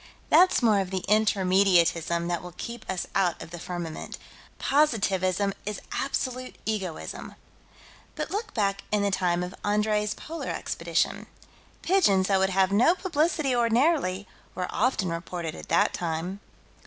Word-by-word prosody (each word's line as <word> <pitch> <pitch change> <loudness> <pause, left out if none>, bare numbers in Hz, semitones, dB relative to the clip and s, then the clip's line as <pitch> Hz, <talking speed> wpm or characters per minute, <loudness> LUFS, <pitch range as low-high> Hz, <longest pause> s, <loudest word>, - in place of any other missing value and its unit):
That's 365 -7 +5
more 215 -3 +4
of 190 -2 -2
the 185 -1 -3
Intermediatism 185 -5 +3
that 175 -1 -1
will 180 -1 -10
keep 235 -1 -7
us 185 -1 -2
out 180 -4 +1
of - - -9
the 175 - -7
firmament: 175 -2 -6 0.4
Positivism 200 - +1
is 210 0 -4
absolute 255 -2 -3
egoism. 195 -6 -4 0.8
But - - -4
look 425 +2 -3
back 200 -3 0
in 210 -1 +2
the 200 - +1
time 180 -2 +1
of 180 +1 -6
Andrée's 210 0 +1
Polar 330 +1 -6
Expedition. - - -1 0.6
Pigeons 205 - +3
that 195 -1 +3
would 190 0 +2
have 190 0 +2
no 245 - +4
publicity 310 -6 0
ordinarily, 235 - +2 0.3
were 180 - -2
often 215 -6 +1
reported 170 -1 -4
at - - -10
that - - +3
time. 175 +3 -3
195 Hz, 140 wpm, -27 LUFS, 180-235 Hz, 0.8 s, That's